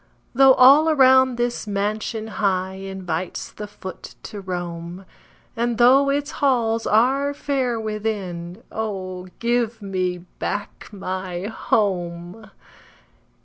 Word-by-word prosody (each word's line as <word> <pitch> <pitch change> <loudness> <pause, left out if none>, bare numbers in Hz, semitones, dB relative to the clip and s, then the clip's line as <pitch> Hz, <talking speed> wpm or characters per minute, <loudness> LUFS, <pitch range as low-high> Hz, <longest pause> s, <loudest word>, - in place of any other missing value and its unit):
Though 265 +1 +7
all 280 +5 +7
around 260 -3 +5
this 240 -2 -2
mansion 215 +2 -2 0.2
high 190 -2 +1
Invites 190 -3 -5
the 210 - -7
foot 195 -2 -10
to 210 -2 -7
roam, 175 0 -6 0.5
And 235 0 -1
though 265 +4 +5
its 285 +1 -1
halls 235 -6 +1
are 270 +6 +2
fair 265 -5 -1
within 210 -4 -4
Oh, 185 -4 -4
give 235 -1 0
me 185 -3 -3
back 205 0 -4
my 185 -2 -5
HOME! 190 -2 -2
215 Hz, 105 wpm, -22 LUFS, 185-245 Hz, 0.5 s, Though